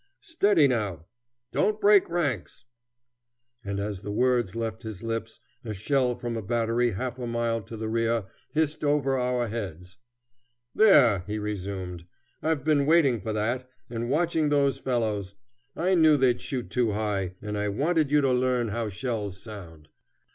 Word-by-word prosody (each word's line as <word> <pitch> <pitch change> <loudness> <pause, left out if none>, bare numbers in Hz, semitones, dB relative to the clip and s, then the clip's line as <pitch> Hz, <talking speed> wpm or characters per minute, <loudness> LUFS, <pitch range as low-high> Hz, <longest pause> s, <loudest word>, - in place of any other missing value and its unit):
Steady 205 - +3
now! 105 - -2 0.5
don't 210 0 +1
break 205 -2 +5
ranks!" 140 - -2 1.0
And 100 0 -3
as 100 -2 -4
the 105 - -7
words 120 -3 +1
left 115 -1 -3
his 110 -2 -7
lips 115 -1 -4 0.2
a 110 -3 -5
shell 125 +4 +1
from 120 -1 -4
a 115 - -3
battery 115 +3 +1
half 125 +4 -4
a 120 - -4
mile 115 -1 -1
to 110 +3 -9
the 110 0 -4
rear 115 -1 0 0.3
hissed 155 0 0
over 140 -3 +2
our 125 -1 0
heads. 90 -5 -6 0.8
"There," 140 - +6
he 105 +1 -3
resumed. 95 -4 -5 0.3
"I've 155 -4 0
been 145 -2 +2
waiting 145 - +4
for 110 - -3
that, 120 +4 -2 0.2
and 120 0 -3
watching 160 +1 +1
those 140 -2 +2
fellows. 105 -6 -1 0.4
I 180 +3 +1
knew 160 -4 +5
they'd 130 -3 +2
shoot 125 -3 -4
too 120 -4 +1
high, 100 -4 -2
and 105 0 -5
I 105 0 -1
wanted 155 - +1
you 150 0 +4
to 135 -2 +2
learn 125 -2 +1
how 115 +1 -2
shells 105 -2 -4
sound." 85 -9 -10
115 Hz, 160 wpm, -27 LUFS, 105-140 Hz, 1.0 s, There